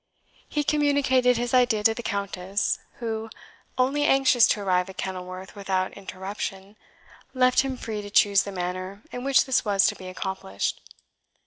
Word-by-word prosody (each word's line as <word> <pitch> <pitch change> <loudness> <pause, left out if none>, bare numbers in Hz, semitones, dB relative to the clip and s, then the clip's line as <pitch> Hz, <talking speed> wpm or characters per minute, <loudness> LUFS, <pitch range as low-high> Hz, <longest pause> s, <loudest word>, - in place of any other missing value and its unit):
He 295 - 0
communicated 280 -4 +3
his 240 +1 -2
idea 245 -4 +3
to 225 - +5
the 240 - -6
Countess, 200 -1 -2 0.2
who, 225 -3 -4 0.5
only 270 +3 +2
anxious 270 -4 +5
to 210 - 0
arrive 185 -1 +1
at 190 - -11
Kenilworth 185 0 -6
without 190 -2 -1
interruption, 195 +1 -6 0.6
left 255 0 +4
him 265 -1 0
free 220 -3 -5
to 205 - -8
choose 200 -1 +5
the 200 - -6
manner 185 +2 -5
in 245 - -6
which 275 0 +4
this 265 -2 +1
was 200 -2 +3
to - - +2
be 185 - -10
accomplished. 185 - -4
205 Hz, 155 wpm, -25 LUFS, 190-250 Hz, 0.6 s, to